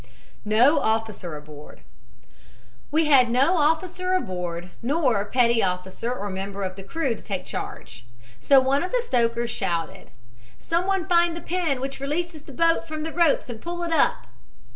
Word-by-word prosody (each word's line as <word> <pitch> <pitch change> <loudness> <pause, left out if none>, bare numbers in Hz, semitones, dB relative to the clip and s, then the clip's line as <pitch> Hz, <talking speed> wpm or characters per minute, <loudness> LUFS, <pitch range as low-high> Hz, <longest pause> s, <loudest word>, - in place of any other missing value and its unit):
NO 245 +8 +4
OFFICER 220 - -2
ABOARD 150 - -12 1.1
"We 315 +2 +2
had 265 -5 +5
no 275 +9 +3
officer 365 +4 +1
aboard, 180 - -3
nor 255 -5 +1
petty 235 0 +3
officer 185 +5 -2
or 205 -5 -4
member 195 +1 -5
of 185 -1 -4
the 195 - -9
crew 265 +6 -2
to 220 - -10
take 195 -3 -4
charge. - - -7 0.4
So 270 - +6
one 265 +2 +1
of 360 - -2
the - - +1
stokers 235 - 0
shouted: 170 -6 -3 0.5
'Someone 360 +2 0
find 345 -2 +3
the - - -4
pin 335 -7 -1
which 270 +1 -5
releases 310 +3 -3
the 285 - -13
boat 330 +3 +2
from 310 -1 -5
the 320 - -5
ropes 340 -4 +2
and 230 -3 -7
pull 345 0 -4
it 335 -1 -1
up!' - - +2
260 Hz, 165 wpm, -24 LUFS, 200-330 Hz, 1.1 s, So